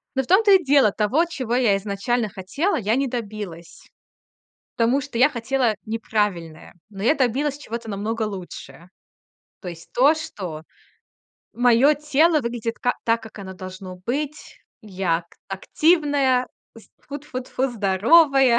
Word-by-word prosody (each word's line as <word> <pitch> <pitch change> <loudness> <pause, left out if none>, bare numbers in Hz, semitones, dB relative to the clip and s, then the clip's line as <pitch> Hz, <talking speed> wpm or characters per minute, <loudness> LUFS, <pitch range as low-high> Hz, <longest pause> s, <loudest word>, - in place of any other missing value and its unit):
Но 265 - +1
в - - -14
том-то 405 +3 +5
и 380 -2 +6
дело, 275 -7 +4
того, 220 - +1
чего 255 -8 -3
я 230 -6 +3
изначально 205 +3 -2
хотела, 200 - -2
я 220 -1 0
не 275 +1 0
добилась. 210 -8 -7 0.9
Потому 240 +4 +2
что 280 -4 -6
я 260 +5 +5
хотела 245 -2 0
неправильное. 205 -7 -3 0.2
Но 195 -2 -8
я 240 - +4
добилась 275 +2 0
чего-то 235 -5 -7
намного 215 +3 -2
лучше. 185 -3 -8 0.7
То 185 - -8
есть 170 -2 -9
то, 275 +5 +5
что 185 - -7 0.9
моё 245 +5 +4
тело 300 +2 +2
выглядит 235 -2 -4
ка 245 - 0
так, 230 0 +1
как 220 -1 -12
оно 190 -1 -8
должно 185 0 -9
быть. 295 +4 -4 0.2
Я 185 -5 -1
ак 170 - -14 0.2
активная, 280 - +2 0.3
з 225 - -16
тфу-тфу-тфу, 265 -2 -4
здоровая. 240 - +4
235 Hz, 140 wpm, -22 LUFS, 200-275 Hz, 0.9 s, и